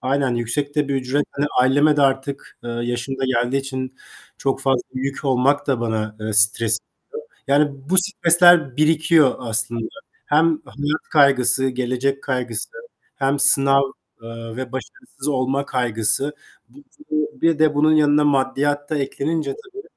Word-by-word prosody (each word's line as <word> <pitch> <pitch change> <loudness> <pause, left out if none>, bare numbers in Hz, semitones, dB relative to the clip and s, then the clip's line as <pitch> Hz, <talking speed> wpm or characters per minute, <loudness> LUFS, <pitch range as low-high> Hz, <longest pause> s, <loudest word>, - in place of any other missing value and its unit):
aynen 135 -1 0
yüksek 140 +5 -3
de 145 -1 0
bir 140 - -1
ücret, 135 +2 -1
hani, 145 +1 -1
aileme 145 +4 +3
de 145 - +2
artık, 135 +1 -2
ııı, 120 0 -4
yaşım 120 +3 -4
da 135 - -1
geldiği 125 +1 0
için 130 -1 -5 0.4
çok 135 0 -2
fazla 135 -2 +1
yük 135 +2 -4
olmak 135 +2 +1
da 130 -4 0
bana, 110 -2 -3
eee, 110 0 -4
stres 110 +1 +3 0.7
veriyor. 140 +2 +3
Yani, 140 -2 -2
bu 190 - +1
stresler 175 -6 +4
birikiyor 155 -1 +3
aslında. 115 -1 -2 0.4
Hem 155 +3 +3 0.2
hayat 145 +2 -3
kaygısı, 135 -3 +4
gelecek 130 +2 -2
kaygısı, 125 -4 -3 0.5
hem 140 0 -1
sınav, 140 0 +5 0.4
ııı, 115 0 -9
ve 130 -2 -6
başarısız 135 - -8
olma 135 0 -1
kaygısı, 120 +3 0 0.4
bu 285 - -18 0.3
bu 155 -1 -3
bir 165 -2 +2
de 155 -1 +3
bunun 155 +2 +3
yanına 150 0 +3
maddiyat 145 +1 0
da 155 - -1
eklenince 140 +1 -3
tabii, 400 +2 -11
135 Hz, 150 wpm, -20 LUFS, 125-145 Hz, 0.7 s, sınav